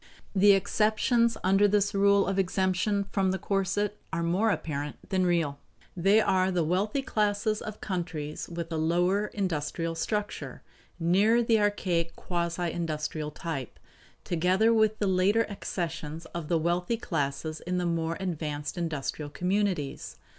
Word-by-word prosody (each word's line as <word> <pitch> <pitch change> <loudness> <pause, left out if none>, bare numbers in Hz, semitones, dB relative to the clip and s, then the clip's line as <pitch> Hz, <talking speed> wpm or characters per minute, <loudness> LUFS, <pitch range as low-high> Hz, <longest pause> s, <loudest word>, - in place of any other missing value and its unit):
The 200 +1 +7
exceptions 220 +4 +2
under 195 +2 +4
this 205 +1 +2
rule 200 0 +4
of 195 0 0
exemption 190 +2 +1
from 195 -2 +1
the 190 - 0
corset 195 +2 -1
are 170 +1 -1
more 185 +7 +2
apparent 150 -7 -2
than 185 -2 +2
real. 160 -5 0 0.4
They 195 +4 +4
are 185 -3 +2
the 180 -3 +1
wealthy 200 - 0
classes 210 -1 0
of 215 -1 -7
countries 165 -6 -4
with 170 -1 -5
a 160 - -1
lower 175 +6 +2
industrial 165 -4 -2
structure 205 +5 -3 0.4
nearer 200 +8 +4
the 225 -1 +3
archaic, 180 -5 0
quasi 170 -1 -2
industrial 155 -2 -3
type 150 -4 -5 0.5
together 185 +6 +2
with 220 -1 +3
the 205 - 0
later 195 +4 +3
accessions 165 -5 -4
of 170 -3 -4
the 170 0 +2
wealthy 175 +7 0
classes 155 -4 -2
in 180 +1 -3
the 180 - 0
more 165 -1 -1
advanced 155 -3 -3
industrial 155 -2 -3
communities. 180 -4 -1
185 Hz, 140 wpm, -28 LUFS, 165-205 Hz, 0.5 s, The